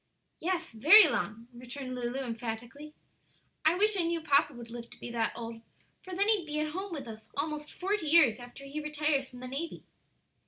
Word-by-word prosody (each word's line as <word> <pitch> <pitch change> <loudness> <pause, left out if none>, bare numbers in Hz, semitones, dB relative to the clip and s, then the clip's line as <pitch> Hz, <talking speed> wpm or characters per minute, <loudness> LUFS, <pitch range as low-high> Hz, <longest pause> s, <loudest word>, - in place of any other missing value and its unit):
"Yes; 355 0 -2
very 315 - +8
long," 230 -4 -2
returned 255 +2 -7
Lulu, 250 +1 -3
emphatically. 240 +4 -6 0.7
"I 315 +2 +4
wish 420 +3 +3
I 375 - +2
knew 335 0 0
papa 290 -1 +3
would 240 -3 -10
live 235 0 -8
to - - -14
be 240 - -7
that 230 -1 0
old, 230 -1 -7 0.4
for 370 -1 -8
then 400 +2 +2
he'd 415 -7 +2
be 300 0 -2
at 305 0 -1
home 380 +4 -4
with 285 -6 -5
us 220 0 -10
almost 300 0 -3
forty 385 -2 -2
years 290 -8 +6
after 245 +3 -11
he 280 +2 -5
retires 300 -2 0
from 250 0 -12
the 255 - -5
navy." 285 +6 -5
285 Hz, 195 wpm, -30 LUFS, 240-330 Hz, 0.7 s, very